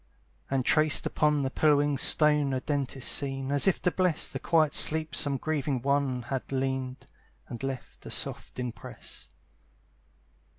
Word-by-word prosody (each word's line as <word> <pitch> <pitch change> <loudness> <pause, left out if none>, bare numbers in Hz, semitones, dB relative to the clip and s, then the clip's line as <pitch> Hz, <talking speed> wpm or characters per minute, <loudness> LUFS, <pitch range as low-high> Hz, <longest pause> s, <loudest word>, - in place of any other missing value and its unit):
And 135 -2 -1
traced 155 -1 +3
upon 150 -2 +1
the 130 - -2
pillowing 145 -2 +2
stone 150 -2 +3
A 130 - 0
dent 140 -1 -3
is 130 - -4
seen, 135 -1 0
as 145 +5 +1
if 190 - +2
to 180 - +2
bless 180 -4 +1
The - - -6
quiet 155 -3 +2
sleep 155 0 +2
some 140 -2 +2
grieving 145 -3 -2
one 140 -3 0
Had 130 +2 -5
leaned, 130 -1 -3 0.4
and 120 - -8
left 135 -1 -6
a - - -7
soft - - -2
impress. 125 -2 -7
140 Hz, 155 wpm, -28 LUFS, 130-150 Hz, 0.4 s, traced